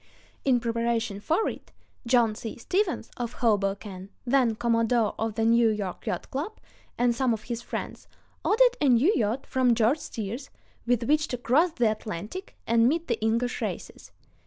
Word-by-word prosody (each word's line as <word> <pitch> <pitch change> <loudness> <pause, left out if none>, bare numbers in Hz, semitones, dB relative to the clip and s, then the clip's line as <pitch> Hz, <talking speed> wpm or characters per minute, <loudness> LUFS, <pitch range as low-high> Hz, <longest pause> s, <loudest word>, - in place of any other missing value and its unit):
In 255 -3 +3
preparation 230 -3 -1
for 325 - +1
it, - - -7 0.4
John 235 -3 +4
C. 220 +1 -7
Stevens, 365 - -1
of 240 -1 -3
Hoboken, 195 -3 -1 0.2
then 245 -3 +3
Commodore 230 -1 +2
of 225 -1 -2
the 225 -1 +1
New 230 0 +5
York 205 -4 -4
Yacht 175 - -3
Club, 310 +11 -4 0.4
and 245 0 +3
some 245 -1 +1
of 215 - -11
his 240 -1 -4
friends, - - -6 0.4
ordered - - +4
a 285 - +4
new 255 - +5
yacht 225 +4 0
from 255 -2 +2
George 235 +7 +3
Steers 230 +4 -6 0.4
with 240 -1 +2
which 305 +5 +2
to 250 - -3
cross 300 +8 +2
the 235 -7 +2
Atlantic 215 - -6
and 230 +1 +4
meet 330 +3 -1
the 235 -2 -1
English 230 +3 0
racers. - - -5
235 Hz, 165 wpm, -27 LUFS, 220-265 Hz, 0.4 s, New